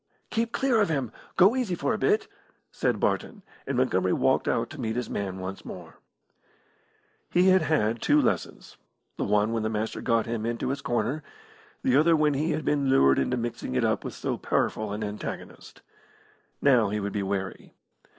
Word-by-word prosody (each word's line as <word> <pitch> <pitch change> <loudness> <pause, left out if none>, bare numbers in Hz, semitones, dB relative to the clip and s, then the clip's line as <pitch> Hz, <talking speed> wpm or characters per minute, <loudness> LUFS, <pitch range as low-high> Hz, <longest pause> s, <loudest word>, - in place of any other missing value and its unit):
"Keep 230 0 0
clear 255 -5 +2
of 200 - +2
him! 135 -7 -1 0.3
Go 190 +6 +6
easy 240 -9 -1
for - - -1
a - - -1
bit," 420 +1 +2 0.4
said - - 0
Barton, 205 -4 -1 0.2
and 140 -2 -1
Montgomery 95 -8 +2
walked - - +2
out - - 0
to - - -7
meet 110 0 -2
his 125 0 -3
man 95 -2 -3
once 95 +1 -6
more. - - -10 1.3
He 180 +2 +4
had 185 0 +5
had 115 -7 +1
two - - +4
lessons - - -2 0.4
the - - -1
one 105 +2 +2
when 115 - 0
the 110 - -1
Master 110 0 -3
got 115 -2 +1
him 115 -2 -3
into 115 +2 -2
his 135 0 -2
corner, 120 +5 -1 0.6
the 260 - +3
other 165 +2 +5
when 150 -1 +3
he 150 +4 0
had 155 - -2
been 140 -2 +1
lured 70 - +5
into 125 - 0
mixing 120 - -4
it 65 - +2
up - - 0
with - - -6
so - - -3
powerful 110 -1 -1
an 105 +1 -3
antagonist. 105 0 -7 0.8
Now 125 -7 +5
he 105 +1 -1
would 100 0 -3
be 105 - -1
wary. 95 -1 -4
120 Hz, 190 wpm, -27 LUFS, 105-155 Hz, 1.3 s, Go